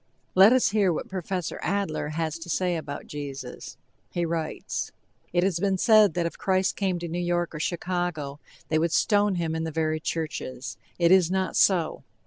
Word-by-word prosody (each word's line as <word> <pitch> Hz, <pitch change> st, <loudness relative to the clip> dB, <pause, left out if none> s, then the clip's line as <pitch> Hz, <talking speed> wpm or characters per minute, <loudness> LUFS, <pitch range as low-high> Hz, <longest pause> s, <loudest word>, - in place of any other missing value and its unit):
Let 195 Hz, +4 st, +8 dB
us 255 Hz, -6 st, +4 dB
hear 200 Hz, -3 st, +3 dB
what 160 Hz, -, -4 dB
Professor 185 Hz, -2 st, -3 dB
Adler 195 Hz, -6 st, -1 dB
has 160 Hz, +1 st, -2 dB
to 165 Hz, -, -9 dB
say 180 Hz, +1 st, +1 dB
about 150 Hz, -3 st, -5 dB
Jesus. 140 Hz, -3 st, -7 dB, 0.3 s
He 175 Hz, -1 st, -1 dB
writes: 165 Hz, -1 st, -3 dB, 0.4 s
It 175 Hz, 0 st, +2 dB
has 185 Hz, -3 st, +1 dB
been 195 Hz, 0 st, +1 dB
said 215 Hz, -3 st, +5 dB
that 175 Hz, -1 st, 0 dB
if 170 Hz, -, -4 dB
Christ 190 Hz, 0 st, +1 dB
came 190 Hz, -3 st, 0 dB
to 170 Hz, 0 st, -5 dB
New 170 Hz, +2 st, -3 dB
York 175 Hz, -1 st, 0 dB
or 155 Hz, -, -5 dB
Chicago, 170 Hz, -4 st, -2 dB, 0.3 s
they 155 Hz, -, +2 dB
would 165 Hz, +1 st, +1 dB
stone 205 Hz, +5 st, +3 dB
him 165 Hz, -2 st, -1 dB
in 160 Hz, 0 st, -2 dB
the 165 Hz, -, -2 dB
very 155 Hz, 0 st, -1 dB
churches. 145 Hz, -5 st, -4 dB, 0.2 s
It 170 Hz, 0 st, +4 dB
is 185 Hz, -3 st, +6 dB
not 190 Hz, 0 st, -1 dB
so! 175 Hz, -5 st, +2 dB
170 Hz, 185 wpm, -26 LUFS, 160-190 Hz, 0.4 s, Let